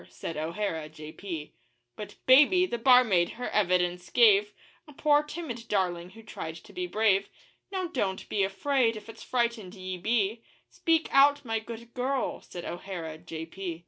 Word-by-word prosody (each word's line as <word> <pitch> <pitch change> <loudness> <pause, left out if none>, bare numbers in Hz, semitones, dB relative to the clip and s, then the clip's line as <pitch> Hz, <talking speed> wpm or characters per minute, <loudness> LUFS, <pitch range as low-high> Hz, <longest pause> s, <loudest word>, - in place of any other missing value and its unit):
said 165 - -6
O'Hara, 160 0 -3
J.P. 155 +1 -8 0.4
But 210 - -8
'Baby,' 295 +8 +6
the 235 -10 -4
barmaid, 230 -8 +5
her 245 - -5
evidence 180 -2 +1
gave 210 -3 +5 0.4
A 295 - -13
poor, 295 +1 +3
timid 295 -7 -7
darling 180 -3 -1
who 225 +4 -14
tried 160 -6 -7
to 165 - -14
be 360 0 -3
brave 210 - +2 0.4
'Now, 375 -2 -2
don't 200 - -2
be 200 - 0
afraid 230 +4 +1
if 215 0 -9
it's - - -11
frightened 235 -6 -1
ye 185 -1 -5
be 220 +2 0 0.3
Speak 325 -1 +1
out, 285 0 +5
my 225 -1 -1
good 235 +1 -10
girl,' 260 +1 -2
said 175 - -9
O'Hara, 170 -3 -6
J.P. 165 +1 -6
210 Hz, 155 wpm, -28 LUFS, 180-250 Hz, 0.4 s, Baby